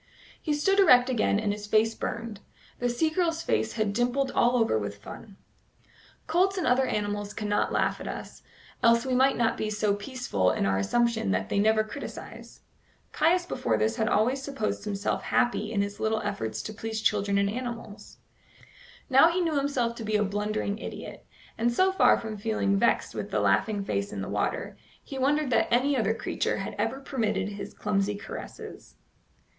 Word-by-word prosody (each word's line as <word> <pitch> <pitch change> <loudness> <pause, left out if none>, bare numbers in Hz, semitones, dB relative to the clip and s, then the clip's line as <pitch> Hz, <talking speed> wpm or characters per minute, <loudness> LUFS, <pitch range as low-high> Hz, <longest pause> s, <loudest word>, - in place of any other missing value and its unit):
He 305 - -1
stood 390 +7 +2
erect 255 -9 +6
again, 215 -3 +2
and 210 -2 0
his 210 0 -7
face 220 +1 +3
burned. 230 -3 -5 0.4
The 245 - 0
sea 315 +7 +1
girl's 330 -1 0
face 220 - 0
had 215 -3 -1
dimpled 250 +4 0
all 240 +1 +3
over 225 - +2
with 100 -1 -5
fun. 195 - -11 0.9
Colts 370 +4 +2
and 360 - -1
other 255 +1 +3
animals 205 0 -2
cannot 210 -1 0
laugh - - 0
at - - -6
us, - - -7 0.4
else 230 +1 +4
we 260 - -1
might 265 +2 +3
not 230 -1 +1
be 215 - -2
so 210 -1 +1
peaceful 205 - -1
in - - 0
our 95 0 +1
assumption 235 - +1
that 95 +1 0
they - - +1
never 215 +1 +3
criticise. 215 - -9 0.5
Caius 350 +3 +2
before 115 - -1
this 110 +1 0
had 220 0 +1
always 250 +6 +2
supposed 270 -7 -3
himself 205 -1 -2
happy 240 -4 0
in 200 -3 +1
his 200 0 -6
little 220 0 0
efforts 195 - -3
to 215 - -6
please 220 0 -4
children 200 -2 +1
and 200 0 +2
animals; 230 -2 -6 0.9
now 270 +4 +7
he 345 +2 0
knew 335 -3 0
himself 275 -4 0
to 230 - -6
be 215 0 -1
a 210 - +3
blundering 210 +1 -2
idiot, - - -8 0.3
and 235 +1 +2
so 375 +10 +3
far 380 - +5
from 220 -2 -6
feeling 210 -2 0
vexed 235 +4 +1
with - - -5
the - - 0
laughing 205 -3 +1
face 200 +1 -2
in - - -4
the - - -5
water, - - -2 0.3
he 270 - -7
wondered 285 +1 +1
that - - +3
any 265 +4 +3
other 225 -3 +1
creature - - -2
had - - -4
ever 270 - -1
permitted 220 -8 -1
his 200 0 -7
clumsy 205 -1 0
caresses. 205 +2 -9
220 Hz, 185 wpm, -27 LUFS, 205-255 Hz, 0.9 s, now